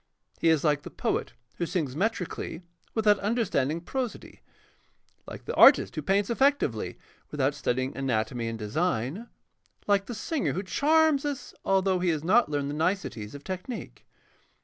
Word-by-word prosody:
He 165 Hz, -, +3 dB
is 160 Hz, -3 st, +3 dB
like 150 Hz, -2 st, +2 dB
the -, -, -9 dB
poet -, -, -2 dB, 0.2 s
who 170 Hz, -, -1 dB
sings 150 Hz, -9 st, -2 dB
metrically 185 Hz, -3 st, -2 dB, 0.3 s
without 210 Hz, -3 st, +4 dB
understanding 195 Hz, -, 0 dB
prosody, 250 Hz, +5 st, -5 dB, 0.9 s
like -, -, -9 dB
the -, -, -3 dB
artist -, -, +7 dB
who -, -, -3 dB
paints 195 Hz, +2 st, +1 dB
effectively 230 Hz, -, +1 dB, 0.3 s
without 145 Hz, -1 st, 0 dB
studying 130 Hz, -2 st, -2 dB
anatomy 120 Hz, -2 st, -1 dB
and 115 Hz, 0 st, -4 dB
design, 135 Hz, -, -2 dB, 0.6 s
like 200 Hz, -1 st, +2 dB
the 240 Hz, -, -5 dB
singer 290 Hz, +6 st, -1 dB
who 190 Hz, -, -3 dB
charms 305 Hz, +6 st, +3 dB
us 290 Hz, -2 st, -4 dB
although 190 Hz, -1 st, +2 dB
he 180 Hz, 0 st, +1 dB
has 155 Hz, -2 st, -1 dB
not 215 Hz, +6 st, +4 dB
learned 145 Hz, -1 st, -1 dB
the -, -, -4 dB
niceties 155 Hz, -, -2 dB
of 145 Hz, -, -10 dB
technique. 190 Hz, +6 st, -7 dB
180 Hz, 150 wpm, -27 LUFS, 140-220 Hz, 0.9 s, artist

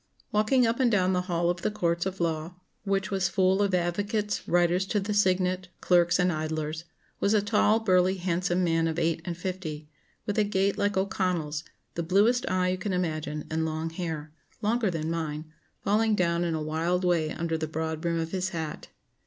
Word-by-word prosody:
] -, -, -33 dB
"Walking 215 Hz, +4 st, +3 dB
up 230 Hz, +2 st, 0 dB
and 255 Hz, -2 st, +4 dB
down 190 Hz, -3 st, +3 dB
the 180 Hz, -, +1 dB
hall 170 Hz, 0 st, +2 dB
of 175 Hz, -1 st, -5 dB
the -, -, +1 dB
courts 170 Hz, -4 st, 0 dB
of 190 Hz, 0 st, -5 dB
law 165 Hz, 0 st, -2 dB, 0.3 s
(which 195 Hz, 0 st, 0 dB
was 190 Hz, -2 st, +1 dB
full 190 Hz, +1 st, +2 dB
of 200 Hz, -2 st, +2 dB
advocates, 205 Hz, +4 st, -1 dB
writers 175 Hz, +2 st, +2 dB
to 210 Hz, -, +1 dB
the 205 Hz, +2 st, -2 dB
signet, 185 Hz, -2 st, +2 dB
clerks, 175 Hz, -1 st, +4 dB
and 180 Hz, -1 st, +2 dB
idlers), 155 Hz, +1 st, -3 dB, 0.3 s
was 200 Hz, +2 st, +2 dB
a 210 Hz, -, +4 dB
tall, 215 Hz, +1 st, +3 dB
burly, 185 Hz, -3 st, +3 dB
handsome 180 Hz, 0 st, 0 dB
man 165 Hz, -1 st, +2 dB
of 160 Hz, 0 st, -2 dB
eight 165 Hz, -1 st, 0 dB
and 170 Hz, -2 st, -4 dB
fifty, 170 Hz, -5 st, -5 dB, 0.4 s
with 205 Hz, +1 st, -1 dB
a -, -, +5 dB
gait 200 Hz, -1 st, +1 dB
like 205 Hz, 0 st, 0 dB
O'Connell's, 180 Hz, -6 st, -1 dB, 0.3 s
the 170 Hz, -, -2 dB
bluest 205 Hz, +9 st, +3 dB
eye 185 Hz, 0 st, +1 dB
you 185 Hz, 0 st, -1 dB
can 190 Hz, 0 st, -2 dB
imagine, 155 Hz, -4 st, -2 dB
and 160 Hz, 0 st, 0 dB
long 160 Hz, +1 st, -2 dB
hair 160 Hz, -3 st, -4 dB, 0.3 s
longer 220 Hz, 0 st, +2 dB
than 165 Hz, -2 st, -2 dB
mine 155 Hz, -2 st, -3 dB, 0.4 s
falling 215 Hz, +2 st, +2 dB
down 170 Hz, -2 st, +1 dB
in 170 Hz, -2 st, 0 dB
a 155 Hz, -, -2 dB
wild 165 Hz, +4 st, 0 dB
way 165 Hz, -3 st, +2 dB
under 165 Hz, -1 st, -2 dB
the 160 Hz, -1 st, -2 dB
broad 160 Hz, 0 st, -3 dB
brim 170 Hz, -1 st, 0 dB
of 165 Hz, 0 st, -3 dB
his 185 Hz, 0 st, -1 dB
hat. 160 Hz, -5 st, -5 dB
180 Hz, 200 wpm, -27 LUFS, 165-195 Hz, 0.4 s, a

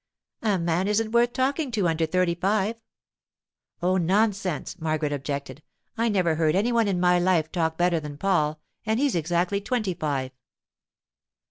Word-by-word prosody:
'A 210 Hz, -4 st, +1 dB
man 170 Hz, +2 st, 0 dB
isn't 215 Hz, +1 st, 0 dB
worth 240 Hz, +1 st, +3 dB
talking 275 Hz, +4 st, 0 dB
to 210 Hz, -7 st, 0 dB
under 160 Hz, 0 st, 0 dB
thirty 180 Hz, +1 st, +1 dB
five.' 205 Hz, +5 st, 0 dB, 1.0 s
'Oh, 185 Hz, +1 st, +2 dB
nonsense!' 190 Hz, -1 st, 0 dB
Margaret 155 Hz, -2 st, -1 dB
objected. 140 Hz, +1 st, -5 dB, 0.3 s
'I 230 Hz, 0 st, +1 dB
never 185 Hz, -6 st, +2 dB
heard 155 Hz, 0 st, +1 dB
any 215 Hz, +6 st, +2 dB
one 230 Hz, -2 st, +2 dB
in 190 Hz, -3 st, 0 dB
my 180 Hz, 0 st, +4 dB
life 175 Hz, -3 st, +1 dB
talk 160 Hz, -2 st, -1 dB
better 175 Hz, -1 st, +2 dB
than 150 Hz, -2 st, -8 dB
Paul, 155 Hz, -4 st, +1 dB, 0.2 s
and 220 Hz, +1 st, 0 dB
he's 285 Hz, -1 st, +2 dB
exactly 175 Hz, +4 st, 0 dB
twenty 215 Hz, -3 st, -1 dB
five. 140 Hz, -5 st, -2 dB
180 Hz, 155 wpm, -25 LUFS, 160-215 Hz, 1.0 s, my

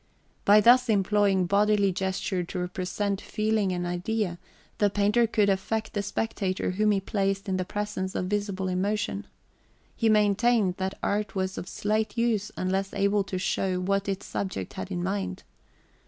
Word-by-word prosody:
By 210 Hz, +1 st, +7 dB
thus 245 Hz, +2 st, +6 dB
employing 200 Hz, -2 st, +3 dB
bodily 200 Hz, +1 st, +3 dB
gesture 190 Hz, 0 st, -2 dB
to 175 Hz, -, -6 dB
represent 185 Hz, +2 st, -2 dB
feeling 215 Hz, -2 st, 0 dB
and 175 Hz, -1 st, -2 dB
idea, 180 Hz, +1 st, -2 dB, 0.4 s
the 205 Hz, -, +4 dB
painter 210 Hz, +4 st, +2 dB
could 210 Hz, -2 st, +2 dB
affect 215 Hz, +3 st, -1 dB
the 205 Hz, -, 0 dB
spectator 200 Hz, -2 st, -2 dB
whom 210 Hz, +3 st, +1 dB
he 205 Hz, -2 st, +3 dB
{xv} 195 Hz, -, -15 dB
placed 195 Hz, -1 st, -1 dB
in 190 Hz, -1 st, 0 dB
the 185 Hz, -, -2 dB
presence 205 Hz, -2 st, -3 dB
of 180 Hz, -, -1 dB
visible 200 Hz, -1 st, -2 dB
emotion. 185 Hz, -, -1 dB, 0.7 s
He 225 Hz, -, +2 dB
maintained 210 Hz, -1 st, +3 dB
that 190 Hz, 0 st, -3 dB
art 210 Hz, 0 st, -1 dB
was 190 Hz, 0 st, -1 dB
of 180 Hz, -, -6 dB
slight 215 Hz, +1 st, -1 dB
use 225 Hz, -3 st, +1 dB
unless 190 Hz, +1 st, -1 dB
able 200 Hz, +1 st, +2 dB
to 190 Hz, -, -4 dB
show 185 Hz, 0 st, 0 dB
what 195 Hz, +2 st, 0 dB
its 195 Hz, 0 st, -3 dB
subject 95 Hz, -, -4 dB
had 95 Hz, -, -6 dB
in 90 Hz, -1 st, -3 dB
mind. 90 Hz, -2 st, -3 dB
200 Hz, 165 wpm, -27 LUFS, 185-210 Hz, 0.7 s, By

